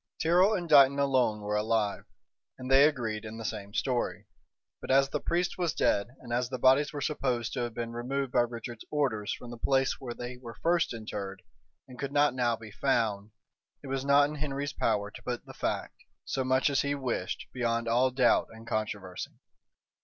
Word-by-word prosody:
Tyrrel 180 +6 +4
and 175 -3 -3
Dighton 140 -3 +7
alone 130 -6 +2
were 105 0 -2
alive, 105 -1 0 0.5
and 130 0 -6
they 135 +2 +8
agreed 115 -8 -1
in 110 0 -7
the 115 - -7
same 100 -2 -4
story; 125 +3 -1 0.6
but - - -8
as 135 +1 +4
the 150 - -2
priest 175 +3 -1
was 175 -4 0
dead, 100 - +2
and 120 -2 -6
as 125 0 0
the 130 - -3
bodies 130 +4 +4
were 145 - -5
supposed 130 -5 -1
to 130 - -2
have 120 -2 -3
been 115 -1 -3
removed 130 +2 -2
by - - +3
Richard's 120 -1 -5
orders 120 -8 0
from 120 - -6
the 120 - -9
place 135 +1 +2
where 120 -3 -6
they 125 +1 -6
were 120 -2 -10
first 170 0 +2
interred, 100 -4 -6 0.4
and 125 -1 -13
could 140 0 -3
not 145 -1 +3
now 120 -2 +1
be 110 -1 -11
found, 110 -4 0 0.5
it - - -8
was 135 0 -1
not 140 +1 +5
in 150 +1 -6
Henry's 145 -1 -3
power 100 0 0
to - - -11
put 120 -1 -4
the - - -11
fact, - - -3 0.3
so 135 - -1
much 130 +2 +2
as 140 - +2
he 140 0 -1
wished, 125 -9 -3
beyond 115 -2 -1
all 125 +3 +3
doubt 125 -1 +3
and 115 0 -13
controversy. 105 -5 -4
125 Hz, 200 wpm, -29 LUFS, 115-140 Hz, 0.6 s, they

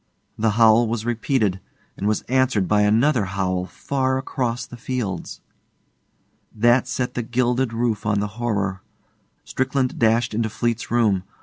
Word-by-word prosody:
The 110 +1 +1
howl 115 0 +6
was 115 0 -3
repeated, 115 -4 0 0.4
and 100 - -3
was 105 -1 +1
answered 130 -6 +1
by 105 0 +3
another 115 +3 +3
howl 95 -1 -2
far 130 +2 -1
across 125 -2 -2
the - - -11
fields. 120 -7 -4 1.1
That 120 +4 +3
set 125 -1 -2
the 125 - -2
gilded 125 +1 0
roof 115 -1 -1
on 105 -1 +1
the 105 - 0 0.2
horror. 100 -5 -1 0.6
Strickland 130 -1 -1
dashed 115 0 +2
into 110 +1 0
Fleete's 115 +1 -2
room. 110 -5 +2
115 Hz, 140 wpm, -22 LUFS, 105-125 Hz, 1.1 s, howl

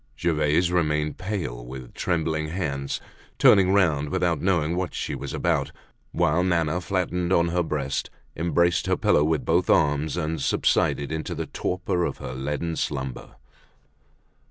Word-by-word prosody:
Gervaise 80 +1 +1
remained 75 -3 0
pale, 90 - -4
with 65 0 -9
trembling 80 -3 -1
hands, 70 -5 -3 0.4
turning 95 -2 +6
round 80 -7 +2
without 85 -1 0
knowing 85 -3 +1
what 90 -1 -3
she - - -3
was - - -5
about, - - 0 0.4
whilst 85 +1 +2
Nana, 85 -1 +1
flattened 90 -1 -1
on 85 -2 +3
her 90 +1 +1
breast, 70 -4 -2 0.3
embraced 85 +1 +1
her - - +2
pillow 75 - +3
with 80 -1 0
both - - +2
arms 75 +2 +2
and 80 -2 -2
subsided 70 +1 +1
into 80 0 -3
the - - -3
torpor 90 -1 -2
of - - -2
her 65 - -6
leaden 75 +5 -3
slumber. 65 -5 -4
80 Hz, 145 wpm, -25 LUFS, 75-90 Hz, 0.4 s, turning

